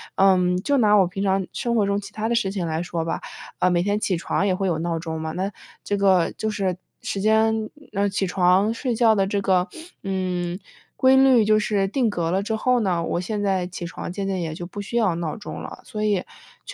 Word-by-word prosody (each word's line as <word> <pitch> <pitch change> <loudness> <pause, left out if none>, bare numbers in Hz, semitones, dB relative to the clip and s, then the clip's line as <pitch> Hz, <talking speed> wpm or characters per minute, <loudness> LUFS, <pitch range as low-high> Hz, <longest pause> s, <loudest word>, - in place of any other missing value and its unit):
嗯， 185 -2 +4
就 280 +10 +1
拿 210 -4 +4
我 195 -3 +5
平 195 +3 -4
常 190 -1 +1
生 235 -1 -1
活 215 -3 +3
中 200 0 +1
其 200 +1 -10
它 220 +1 -2
的 235 - +1
事 195 -5 +1
情 185 -4 -2
来 160 +1 -2
说 170 -2 -3
吧， - - -3 0.4
呃， 180 - +3
每 175 -1 +2
天 205 +2 0
起 190 - 0
床 190 - -1
也 195 - +2
会 190 +1 -1
有 170 - 0
闹 165 -1 -1
钟 160 -1 -4
嘛， 160 0 -3
那 190 +4 -2 0.3
这 205 - -1
个 190 -3 +3
就 220 - -3
是 190 -4 -1 0.2
时 195 - -3
间 220 +1 +2 0.2
呃， 200 +1 +1
起 195 0 -1
床 185 +3 +3
睡 245 0 -2
觉 225 -1 +4
的 195 -2 +2
这 200 0 -1
个， 185 -1 +2 0.4
嗯， 185 -2 -2 0.4
规 265 0 +5
律 260 -4 +6
就 215 0 +4
是 210 -2 +1
定 245 +1 +1
格 170 -4 -1
了 190 - +1
之 220 +1 -1
后 250 +2 +2
呢， 180 -5 0
我 170 - -1
现 205 +3 -3
在 190 -2 0
起 180 -1 -6
床 170 - -6
渐 195 +1 -4
渐 190 -2 -1
也 160 -2 -3
就 175 +2 -6
不 205 +3 -7
需 200 +4 -7
要 210 -7 +2
闹 165 -2 -3
钟 210 - -7
了。 - - -9
所 215 -4 -5
以 205 -4 +1 0.4
确 - - -8
195 Hz, 260 characters per minute, -23 LUFS, 180-215 Hz, 0.4 s, 律